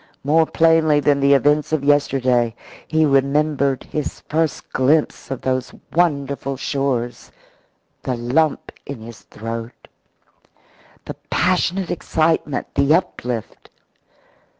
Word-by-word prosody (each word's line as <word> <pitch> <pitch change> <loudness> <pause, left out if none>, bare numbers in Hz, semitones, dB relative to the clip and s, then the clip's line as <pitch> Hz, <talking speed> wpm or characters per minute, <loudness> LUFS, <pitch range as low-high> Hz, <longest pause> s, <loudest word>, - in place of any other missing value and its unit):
More 160 +3 +3
plainly 165 -2 +3
than 145 -1 +2
the 140 0 +5
events 145 +2 +2
of 155 -3 0
yesterday, 130 -5 +2 0.3
he 160 0 +2
remembered 140 0 +1
his 150 -2 -5
first 160 -2 -2
glimpse 145 +4 +1
of 135 - -4
those 130 -1 -2 0.2
wonderful 140 -5 0
shores 125 -4 -2 0.7
the 130 - -2
lump 135 +6 0
in 135 -5 -8
his 115 -2 -11
throat, 115 +5 -8 1.2
the - - -5 0.2
passionate 185 0 +1
excitement, 160 -3 -1
the 140 +3 +4
uplift. 125 - -4
140 Hz, 105 wpm, -20 LUFS, 130-155 Hz, 1.2 s, the